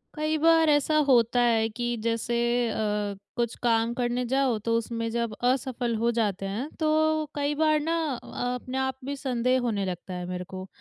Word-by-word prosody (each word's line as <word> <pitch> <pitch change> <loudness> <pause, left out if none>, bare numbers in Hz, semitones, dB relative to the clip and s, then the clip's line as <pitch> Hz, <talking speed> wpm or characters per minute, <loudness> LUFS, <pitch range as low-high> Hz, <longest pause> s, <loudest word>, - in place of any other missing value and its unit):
कई 310 +1 0
बार 325 0 +5
ऐसा 295 +1 +3
होता 245 -2 +4
है 225 -2 +3
कि 240 +2 -4 0.2
जैसे 230 +1 -1 0.3
अ, 210 -2 -1 0.2
कुछ 235 -1 -1
काम 230 0 +2
करने 245 0 -1
जाओ 265 -1 +1
तो 230 0 +2
उसमें 230 0 -3
जब 235 -1 -1
असफ़ल 250 -2 0
हो 235 +1 +3
जाते 200 -4 0
हैं 215 +9 -3
तो 315 0 +2
कई 290 0 0
बार 310 -1 +4
ना 330 +2 0 0.3
अ, 245 0 -3
अपने 255 +1 -5
आप 265 -1 -1
भी 285 +1 -3
संदेह 255 -1 0
होने 215 -5 -1
लगता 185 0 -5
है 180 0 -4
मेरे 180 0 -4
को। 185 0 -6
240 Hz, 185 wpm, -27 LUFS, 225-275 Hz, 0.3 s, बार